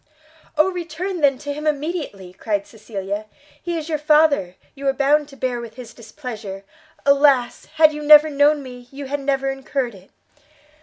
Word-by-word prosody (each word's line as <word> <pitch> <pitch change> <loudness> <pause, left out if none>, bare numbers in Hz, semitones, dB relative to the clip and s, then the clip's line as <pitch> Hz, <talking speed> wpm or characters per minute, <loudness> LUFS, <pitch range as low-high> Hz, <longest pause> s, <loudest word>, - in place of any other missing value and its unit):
"Oh 310 +5 +4
return, 350 +1 -4
then, 275 -2 +4
to 290 +1 -5
him 300 +2 -7
directly!" 290 - -3
cried 200 +1 -2
Cecilia, 205 -1 -6 0.3
"he 345 -1 -3
is 315 -1 -5
your 310 -2 -1
father, 300 - +3 0.2
you 275 -1 -5
are 270 - +3
bound 285 +2 +2
to 280 - -14
bear 250 -3 -2
with 230 -2 -10
his 240 -3 -10
displeasure; 220 -5 -8 0.4
alas! 280 -3 +3
had 310 -1 +6
you 300 - -6
never 300 +1 +8
known 290 +1 +3
me, 250 -2 -11
you 280 +1 -8
had 285 +2 -3
never 270 -1 0
incurred 270 -2 -3
it!" 190 -1 -16
275 Hz, 170 wpm, -21 LUFS, 235-300 Hz, 0.4 s, never